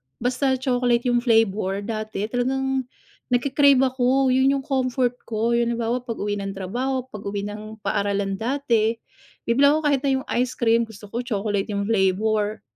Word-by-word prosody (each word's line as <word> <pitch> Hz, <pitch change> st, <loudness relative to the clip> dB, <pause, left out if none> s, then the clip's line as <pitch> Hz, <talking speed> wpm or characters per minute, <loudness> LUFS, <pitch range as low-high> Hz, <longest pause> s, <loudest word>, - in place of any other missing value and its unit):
basta 255 Hz, +2 st, 0 dB
chocolate 245 Hz, -2 st, +1 dB
yung 240 Hz, -, +3 dB
flavor, 215 Hz, -4 st, +1 dB
dati, 215 Hz, -1 st, -4 dB
talagang 265 Hz, +1 st, -1 dB, 0.4 s
nagke-crave 270 Hz, +2 st, +4 dB
ako, 260 Hz, 0 st, +2 dB
yun 265 Hz, +2 st, +3 dB
yung 275 Hz, -, -3 dB
comfort 255 Hz, -2 st, 0 dB
ko, 230 Hz, +1 st, 0 dB
yung 235 Hz, 0 st, +2 dB
halimbawa, 235 Hz, +2 st, -1 dB
pag-uwi 210 Hz, -4 st, -3 dB
ng 195 Hz, -1 st, -5 dB
trabaho, 250 Hz, +7 st, -2 dB
pag-uwi 200 Hz, -1 st, -5 dB
ng 215 Hz, +1 st, -7 dB
paaralan 200 Hz, -1 st, -1 dB
dati, 235 Hz, -3 st, +1 dB, 0.5 s
bibili 270 Hz, +5 st, +4 dB
ako 310 Hz, +2 st, +2 dB
kahit 285 Hz, -3 st, +2 dB
na 275 Hz, 0 st, 0 dB
yung 265 Hz, -, -3 dB
ice 250 Hz, +1 st, 0 dB
cream, 230 Hz, -1 st, +2 dB
gusto 210 Hz, -2 st, -13 dB
ko 235 Hz, -, -3 dB
chocolate 205 Hz, -4 st, -2 dB
yung 200 Hz, -, -1 dB
flavor. 210 Hz, +1 st, +1 dB
235 Hz, 155 wpm, -23 LUFS, 210-260 Hz, 0.5 s, nagke-crave